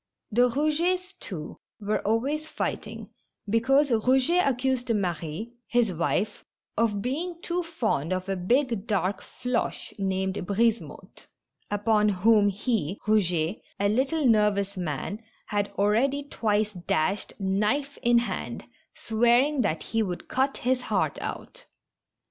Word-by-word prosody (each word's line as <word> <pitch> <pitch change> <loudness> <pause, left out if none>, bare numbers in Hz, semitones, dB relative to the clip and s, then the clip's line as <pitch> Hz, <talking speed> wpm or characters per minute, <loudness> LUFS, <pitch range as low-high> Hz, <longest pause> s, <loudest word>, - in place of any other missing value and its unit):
The 245 +3 +4
Eougets, 340 +7 0
too, 155 -6 -7 0.2
were 210 0 0
always 275 +9 0
fighting, - - -4 0.4
because 265 +6 +3
Eouget 260 +10 +3
ac 270 - +2
cused 255 0 -1
Marie, 175 +3 -3
his 240 -5 +2
wife, 175 +5 -1 0.3
of 210 -3 +1
being 335 +7 -3
too 355 +1 -1
fond 225 - -1
of 185 0 -2
a 195 - -1
big, 230 +3 +1
dark 200 -2 0
Floche, 250 -1 -3
named 190 0 -1
Brisemotte, 225 +3 -1 0.4
upon 210 +1 +2
whom 205 +2 +4
he, 200 - -1
Eouget 180 -4 +1 0.2
(a 200 0 +2
little 270 +7 +1
nervous 210 -3 +3
man), 180 - -3 0.2
had 205 -1 -1
already 240 +8 +2
twice 215 -6 0
dashed, 180 +2 -1
knife 210 +9 0
in 240 -1 +4
hand, 235 - -2 0.3
swearing 240 +5 +3
that 155 -8 -1
he 225 - -1
would 180 -5 -3
cut 270 +1 0
his 255 0 +2
heart - - -1
out. - - -7
220 Hz, 125 wpm, -27 LUFS, 200-260 Hz, 0.4 s, The